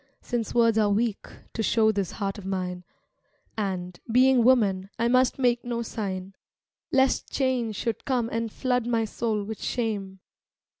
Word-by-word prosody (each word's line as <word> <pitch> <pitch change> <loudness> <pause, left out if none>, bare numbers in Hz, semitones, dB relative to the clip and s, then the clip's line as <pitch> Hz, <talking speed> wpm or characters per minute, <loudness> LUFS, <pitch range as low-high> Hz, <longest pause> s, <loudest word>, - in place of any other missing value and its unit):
Since 240 -2 -3
words 230 -2 +4
are 210 -1 +3
weak 215 +1 0 0.3
to 225 - -2
show 220 0 +3
this 200 -4 -2
heart 200 0 -3
of - - -10
mine, 180 -2 -3 0.7
And, 185 -4 -3
being 255 0 +5
woman, 200 -7 +3
I 235 +1 +1
must 255 +1 +3
make 245 -2 +2
no 235 -1 -2
sign, 195 -4 -4 0.6
Lest 265 0 +2
change 250 -5 0
should 230 +1 -3
come 250 -4 0
and 230 -1 -2
flood 250 -1 0
my 230 -2 +1
soul 220 -1 -2
with 215 +1 -6
shame. 205 -5 -2
225 Hz, 155 wpm, -26 LUFS, 200-240 Hz, 0.7 s, being